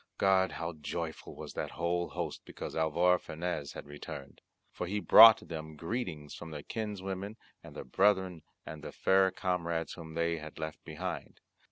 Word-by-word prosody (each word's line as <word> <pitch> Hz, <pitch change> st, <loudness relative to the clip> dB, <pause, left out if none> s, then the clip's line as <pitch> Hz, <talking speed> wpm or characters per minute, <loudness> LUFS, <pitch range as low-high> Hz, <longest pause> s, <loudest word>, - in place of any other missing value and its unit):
God, 95 Hz, -1 st, +3 dB
how 85 Hz, +1 st, -4 dB
joyful 80 Hz, +1 st, -5 dB
was -, -, -8 dB
that -, -, -3 dB
whole 85 Hz, +1 st, -1 dB
host 85 Hz, -4 st, -4 dB
because -, -, -7 dB
Alvar 85 Hz, +3 st, +3 dB
Fanez 80 Hz, -3 st, -4 dB
was -, -, -7 dB
returned! 70 Hz, -1 st, -9 dB, 0.3 s
for 90 Hz, -, -4 dB
he 105 Hz, +3 st, -1 dB
brought 110 Hz, +2 st, +9 dB
them 80 Hz, -2 st, -6 dB
greetings 85 Hz, -, -4 dB
from 85 Hz, -, -8 dB
their 75 Hz, -2 st, -7 dB
kinswomen 100 Hz, -1 st, -4 dB, 0.3 s
and -, -, -12 dB
their -, -, -5 dB
brethren 95 Hz, +4 st, +2 dB, 0.2 s
and 75 Hz, -2 st, -8 dB
the -, -, -6 dB
fair 95 Hz, 0 st, +4 dB
comrades 85 Hz, -3 st, -2 dB
whom 80 Hz, -2 st, -9 dB
they 85 Hz, 0 st, 0 dB
had 80 Hz, 0 st, -9 dB
left 80 Hz, -1 st, -5 dB
behind. -, -, -5 dB
85 Hz, 165 wpm, -32 LUFS, 80-95 Hz, 0.3 s, brought